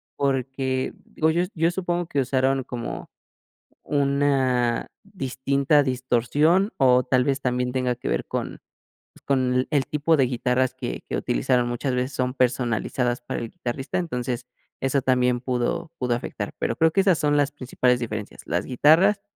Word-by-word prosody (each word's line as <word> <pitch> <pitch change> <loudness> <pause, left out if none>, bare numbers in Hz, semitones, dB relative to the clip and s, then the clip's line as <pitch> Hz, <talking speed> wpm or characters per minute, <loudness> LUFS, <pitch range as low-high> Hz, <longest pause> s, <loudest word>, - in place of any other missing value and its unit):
porque, 135 -1 -1
digo 160 - 0
yo 170 +2 +1
yo 165 0 +2
supongo 175 -1 -2
que 145 - -1
usaron 135 0 +1
como 120 -2 -6 0.7
una 135 -4 +1 0.2
distinta 140 -4 +1
distorsión, 135 - +1
o 125 -1 +5
tal 125 -1 +2
vez 140 +1 0
también 125 -1 0
tenga 125 -1 0
que 125 - -7
ver - - -1
con, - - -4 0.5
pues, - - -20
con 130 -2 +1
el 145 -4 +1
tipo 150 +2 +2
de 135 - +4
guitarras 125 +1 0
que - - -5
que - - -2
utilizaron, 120 - +1
muchas 120 +2 -2
veces 125 +2 -1
son 125 0 -1
personalizadas 125 -1 0
para 120 - -4
el 115 - -5
guitarrista, 130 +3 -4
entonces, 125 -7 -3 0.4
eso 135 +1 +1
también 125 -1 +2
pudo 130 +7 -2
pudo 125 -2 +1
afectar. 120 - -5
Pero - - -1
creo 160 0 +3
que 195 - +3
esas 190 -4 +3
son 145 0 +2
las 145 0 +2
principales 125 -3 0
diferencias, 110 -3 -5
las 85 +3 -1
guitarras 165 +10 +4
130 Hz, 160 wpm, -24 LUFS, 125-145 Hz, 0.7 s, o